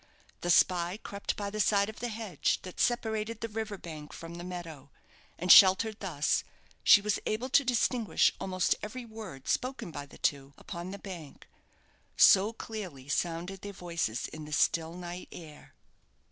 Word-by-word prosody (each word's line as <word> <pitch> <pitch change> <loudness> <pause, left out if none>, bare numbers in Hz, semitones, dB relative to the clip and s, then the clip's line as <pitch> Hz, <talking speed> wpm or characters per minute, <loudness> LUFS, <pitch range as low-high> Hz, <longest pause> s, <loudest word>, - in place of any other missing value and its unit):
The 175 - -3
spy 175 +1 +3
crept 200 0 -4
by 200 -1 -4
the 215 - -5
side 200 0 +3
of 220 - -8
the 245 - -2
hedge 215 -7 -1
that 185 - -9
separated 220 -2 0
the 230 - -2
river 220 -1 -4
bank 155 -4 -9
from 165 0 -9
the 175 0 -7
meadow; 170 -6 -8 0.5
and 180 +1 +3
sheltered 205 +3 +7
thus, 155 -6 0 0.4
she 205 - +8
was 210 0 0
able 235 +5 -2
to 280 - +5
distinguish 240 -2 +2
almost 185 -1 +1
every 240 +4 -6
word 215 - -9
spoken 255 -8 -2
by 145 -2 -7
the - - -15
two 140 -1 -1
upon 170 +1 -7
the 200 - -6
bank, 175 -8 -10 0.7
so 200 +3 +7
clearly 185 - -8
sounded 175 +4 -2
their 205 0 -7
voices 170 - -3
in 155 0 -9
the 150 - -8
still 165 +2 +1
night 180 0 -7
air. 155 -3 -12
185 Hz, 165 wpm, -30 LUFS, 165-215 Hz, 0.7 s, she